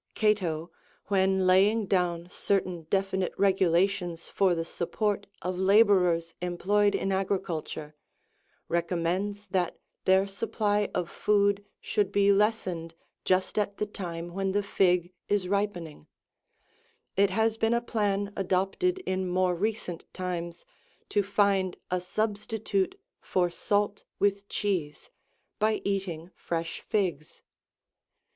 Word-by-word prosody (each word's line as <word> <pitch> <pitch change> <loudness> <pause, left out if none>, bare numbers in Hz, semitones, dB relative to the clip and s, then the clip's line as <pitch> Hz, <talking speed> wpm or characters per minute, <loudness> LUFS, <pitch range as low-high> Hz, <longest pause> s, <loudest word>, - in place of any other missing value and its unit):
91 215 -1 +5 0.3
Cato,92 - - -24 0.4
when 190 -1 +3
laying 200 +4 +4
down 175 -3 0
certain 185 -6 -1
defi 195 0 +1
nite 185 -1 -2
regulations 185 -2 +2
for 190 -3 +2
the 165 0 -2
support 200 +4 -2 0.2
of 180 0 -2
labourers 190 -4 +4
employed 200 +4 +2
in 195 - -1
agri 195 +1 +1
culture, 155 -4 -5 0.7
recommends 180 +4 -1
that 180 -2 0 0.3
their 190 +1 +5
supply 205 0 0
of 180 -1 0
food 200 +1 +2 0.2
should 210 -3 0
be 200 0 +4
lessened 190 -6 0 0.3
just 185 +3 +2
at 200 -1 -1
the 210 - 0
time 170 -5 -6
93 175 - -12
when 195 0 0
the 205 0 +1
fig 180 -3 +2 0.2
is 205 -3 +1
ripening: 180 - -2 1.1
it 200 0 +4
has 220 +3 +1
been 225 +1 +3
a - - +3
plan 205 -3 -1
adopted 195 - 0
in 185 0 -1
more 180 0 +2
recent 185 -2 -3
times, 175 -2 -4 0.4
to 205 - +2
find 200 -2 +1
a 180 0 +1
substitute 205 0 -1 0.2
for 175 -2 0
salt 205 +3 0
with 200 0 +1
cheese, 180 - -2 0.5
by 215 0 +2
eating 185 -4 -2
fresh 165 -1 -4
figs. 180 -8 -2
195 Hz, 125 wpm, -28 LUFS, 180-205 Hz, 1.1 s, 91